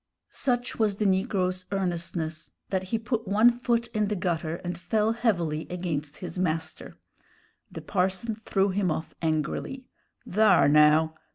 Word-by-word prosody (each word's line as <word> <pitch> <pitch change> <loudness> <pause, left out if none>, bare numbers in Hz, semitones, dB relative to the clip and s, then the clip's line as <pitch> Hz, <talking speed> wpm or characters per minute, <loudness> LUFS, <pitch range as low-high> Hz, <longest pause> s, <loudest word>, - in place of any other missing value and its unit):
Such 245 -3 -1
was 210 -3 +2
the 210 - -1
negro's 185 -2 0
earnestness 170 -4 -3 0.2
that 190 -1 0
he 225 +5 -1
put 230 -1 -3
one 215 +5 +5
foot 235 -1 0
in 215 -2 0
the 210 - -1
gutter, 170 -3 -1
and 175 -1 -3
fell 215 +5 0
heavily 175 -10 0
against 160 -5 -4
his 180 - -6
master. 165 -3 -3 0.7
The - - -7
parson 190 +4 0
threw 200 -2 0
him 190 -1 0
off 160 0 -3
angrily. 160 - -2 0.4
"Thar, 215 -2 +5
now! 150 +2 +5
185 Hz, 145 wpm, -27 LUFS, 165-220 Hz, 0.7 s, one